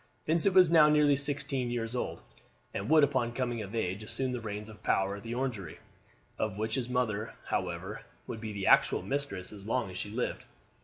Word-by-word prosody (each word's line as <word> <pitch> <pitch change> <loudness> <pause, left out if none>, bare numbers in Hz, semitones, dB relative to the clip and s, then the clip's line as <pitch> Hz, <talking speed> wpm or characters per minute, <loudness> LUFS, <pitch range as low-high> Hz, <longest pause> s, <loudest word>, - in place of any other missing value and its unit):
Vincent 170 +4 +3
was 180 -3 +7
now 155 -3 +7
nearly 150 -1 +5
sixteen 140 -2 -1
years 120 0 -2
old, 125 - -3 0.5
and 100 +5 -3
would 155 -1 +6
upon 125 -4 +2
coming 120 -2 -2
of 105 +2 -6
age 95 -2 -1
assume 130 +4 -2
the 125 - -2
reins 105 -1 -5
of 110 -1 -12
power 95 +1 +1
at - - -10
the 115 +3 -5
Orangery, 115 -10 -3 0.6
of 105 -2 -1
which 110 +1 -2
his 125 -1 -1
mother, 115 -4 -1
however, 90 +3 -3 0.2
would 110 - -6
be 110 -1 -4
the 100 -2 -4
actual - - +5
mistress 140 -9 -3
as 100 0 -10
long 115 -5 0
as 90 - -6
she 105 - -4
lived. 120 +4 -3
115 Hz, 200 wpm, -31 LUFS, 105-135 Hz, 0.6 s, was